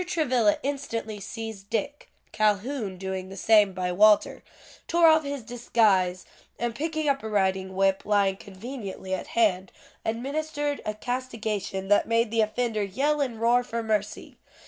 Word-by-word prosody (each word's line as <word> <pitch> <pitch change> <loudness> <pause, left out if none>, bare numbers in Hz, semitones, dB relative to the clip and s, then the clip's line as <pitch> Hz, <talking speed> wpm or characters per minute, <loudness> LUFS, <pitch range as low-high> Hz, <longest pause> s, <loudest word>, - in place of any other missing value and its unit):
Travilla 255 - +2
instantly 230 -6 -3
seized 220 -1 -7
Dick, 285 +6 -3 0.2
(Calhoun 215 0 0
doing 190 0 -5
the 195 - -9
same 210 0 +5
by 180 -1 -2
Walter), 210 +3 +4 0.5
tore 340 0 +4
off 315 0 +5
his 280 -3 -4
disguise, 210 -6 +1 0.3
and 240 0 -2
picking 315 +4 -2
up 275 -1 +1
a 220 - -5
riding 190 -2 0
whip, 195 0 +2
lying 200 -2 +2
conveniently 200 -2 -7
at 190 - -3
hand, 195 -5 +1 0.3
administered 290 +5 -2
a 215 - -2
castigation 220 -5 -3
that 205 - +4
made 230 -1 +1
the 225 -1 +2
offender 220 0 -1
yell 275 +10 0
and 240 -5 -2
roar 240 +2 +3
for 235 -1 -4
mercy. 215 -2 -2
220 Hz, 145 wpm, -26 LUFS, 195-255 Hz, 0.5 s, same